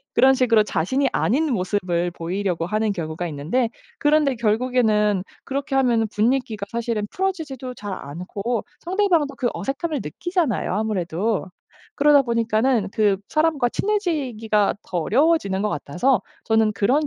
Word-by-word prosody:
그런 265 Hz, +1 st, +6 dB
식으로 235 Hz, -4 st, +4 dB
자신이 260 Hz, -, 0 dB
아닌 295 Hz, +7 st, +1 dB
모습을 180 Hz, -4 st, 0 dB
보이려고 175 Hz, 0 st, -2 dB
하는 215 Hz, +2 st, 0 dB
경우가 165 Hz, -2 st, -4 dB
있는데 165 Hz, -, -1 dB, 0.3 s
그런데 295 Hz, -2 st, +3 dB
결국에는 215 Hz, -3 st, +2 dB, 0.2 s
그렇게 275 Hz, +1 st, -3 dB
하면은 235 Hz, -4 st, +3 dB
분위기가 225 Hz, -2 st, 0 dB
사실은 230 Hz, -3 st, -2 dB
풀어지지도 315 Hz, -10 st, -3 dB
잘 205 Hz, -3 st, -6 dB
않고 190 Hz, -, -4 dB, 0.2 s
상대방도 345 Hz, -6 st, +1 dB
그 245 Hz, -, 0 dB
어색함을 290 Hz, +2 st, -3 dB
느끼잖아요 300 Hz, -, -1 dB
아무래도. 205 Hz, -1 st, -1 dB, 0.5 s
그러다 290 Hz, -1 st, +6 dB
보니까는 230 Hz, -2 st, +1 dB
그 205 Hz, -3 st, +2 dB
사람과 310 Hz, -5 st, +2 dB
친해지기가 260 Hz, -, 0 dB
더 180 Hz, -, -3 dB
어려워지는 220 Hz, -, +2 dB
것 210 Hz, -, +1 dB
같아서 180 Hz, -, 0 dB, 0.2 s
저는 220 Hz, -1 st, +3 dB
그런 260 Hz, +10 st, +2 dB
230 Hz, 355 characters per minute, -22 LUFS, 200-275 Hz, 0.5 s, 그런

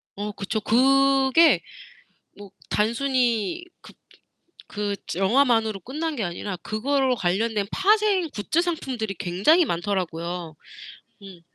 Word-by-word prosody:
어 205 Hz, +1 st, -4 dB
그쵸. 205 Hz, +2 st, -3 dB
그게 270 Hz, +5 st, +4 dB, 0.8 s
뭐 205 Hz, -1 st, -11 dB, 0.2 s
단순히 240 Hz, -, 0 dB, 0.2 s
그 -, -, -15 dB, 0.7 s
그 205 Hz, -1 st, -3 dB, 0.2 s
영화만으로 220 Hz, +1 st, +2 dB
끝난 300 Hz, -, -4 dB
게 225 Hz, -, -2 dB
아니라 180 Hz, +2 st, -5 dB
그거 260 Hz, +4 st, 0 dB
관련된 205 Hz, +3 st, 0 dB
파생 400 Hz, -3 st, +2 dB
굿즈 310 Hz, +11 st, 0 dB
상품들이 265 Hz, -, -3 dB
굉장히 205 Hz, -, +3 dB
많더라고요. 170 Hz, -, -3 dB, 0.7 s
음. 190 Hz, -3 st, -12 dB
225 Hz, 230 characters per minute, -24 LUFS, 195-275 Hz, 0.8 s, 그게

